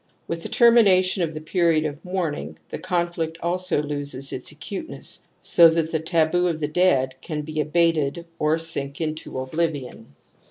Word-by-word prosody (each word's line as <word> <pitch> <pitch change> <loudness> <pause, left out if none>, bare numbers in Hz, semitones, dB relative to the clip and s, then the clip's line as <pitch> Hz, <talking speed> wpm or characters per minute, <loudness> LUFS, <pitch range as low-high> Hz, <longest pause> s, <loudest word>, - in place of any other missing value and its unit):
With 170 0 -4
the - - -6
termination 200 -6 +5
of 160 -2 -1
the 155 - -5
period 165 -1 +2
of 150 +1 -5
mourning, 160 - -3
the - - -5
conflict 175 -3 -2
also 180 -3 0
loses 145 -2 -2
its 130 - -4
acuteness 175 - -6 0.2
so 170 - +7
that 165 0 0
the 160 - 0
taboo 165 +2 +1
of 165 -2 -2
the 150 - -1
dead 150 -6 +2
can 150 -2 -4
be 155 0 -2
abated 165 0 +1
or 155 +1 +2
sink 145 -4 -3
into 155 -3 -4
oblivion. 130 - -3
160 Hz, 160 wpm, -23 LUFS, 150-175 Hz, 0.2 s, so